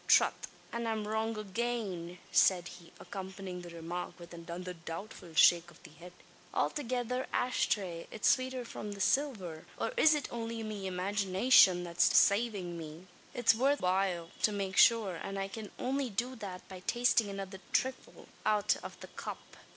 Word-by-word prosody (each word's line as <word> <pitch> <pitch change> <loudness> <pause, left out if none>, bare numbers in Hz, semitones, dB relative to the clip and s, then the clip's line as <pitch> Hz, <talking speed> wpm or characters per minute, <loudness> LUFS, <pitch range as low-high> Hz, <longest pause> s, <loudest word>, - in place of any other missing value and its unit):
"Trath! - - +6 0.4
an 235 0 -2
I'm 220 -2 -2
wrong 220 +1 -1
agane!" 205 -5 -3
said 180 -2 +4
he, 170 -1 -13
accompanying 190 -2 -7
the 175 - -9
remark 170 +1 -6
with 175 0 -11
another 170 +2 -6
doubtful 170 0 -8
shake 170 +1 +6
of 170 - -19
the - - -13
head. 170 +4 -12 0.4
"Althegither 250 -2 -1
asthray. 190 -8 0
It's 215 - -1
swater 255 -1 -5
from 210 -2 -6
the 200 - -10
silver. 195 - 0
Or, - - -1
is 315 -9 +6
it 295 - -2
only 230 -1 -4
me 205 -3 -4
imaginayshin 190 +1 +4
that's 175 0 +3
desavin' 200 -5 +3
me? 160 +2 -9 0.3
It's 240 -2 +5
worth 275 +6 +2
while 180 -2 0
to 215 - +4
make 195 -2 -3
shure, 215 -7 +5
an 195 +3 -5
I 195 0 -2
can 210 +1 -7
only 265 0 -1
do 245 +5 -2
that 195 -5 -8
by 190 -1 -9
tastin' 240 -3 +3
another 195 -1 -6
thrifle 260 0 -2 0.2
out 210 -1 +2
av - - -8
the - - -8
cup. - - -8
195 Hz, 160 wpm, -32 LUFS, 180-230 Hz, 0.4 s, Trath